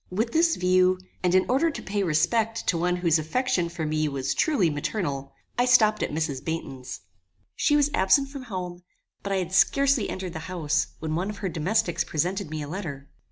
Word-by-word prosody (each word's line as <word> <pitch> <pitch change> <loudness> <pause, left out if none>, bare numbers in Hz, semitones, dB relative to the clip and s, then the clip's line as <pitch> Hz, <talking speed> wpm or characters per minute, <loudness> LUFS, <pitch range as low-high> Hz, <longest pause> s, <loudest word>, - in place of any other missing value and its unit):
With 220 +6 -1
this 330 +1 +3
view, 185 0 +3 0.2
and 180 0 +2
in 185 - +4
order 275 +7 +2
to 310 - -6
pay 200 +1 -2
respect 215 +7 +1
to 180 - +2
one 175 +2 +1
whose 170 -3 +2
affection 175 - 0
for 170 -2 -4
me 155 0 0
was 135 -1 -2
truly 225 - +2
maternal, 145 -3 -3 0.3
I 245 - +4
stopped 215 -4 +4
at - - 0
Mrs. 150 -4 -2
Baynton's. 135 - -5 0.5
She 295 - +2
was 295 0 +3
absent 230 +9 +3
from 275 -2 -8
home; 180 -5 -5 0.4
but 200 - -4
I - - +2
had 185 -1 -2
scarcely 275 +4 +3
entered 185 -2 -5
the 160 - -5
house 155 -4 0
when 155 -1 -4
one 180 +5 -1
of 210 - -6
her - - 0
domestics 175 +2 0
presented 180 +3 -2
me 155 -1 -4
a - - -6
letter. 145 -5 -6
180 Hz, 200 wpm, -26 LUFS, 155-215 Hz, 0.5 s, in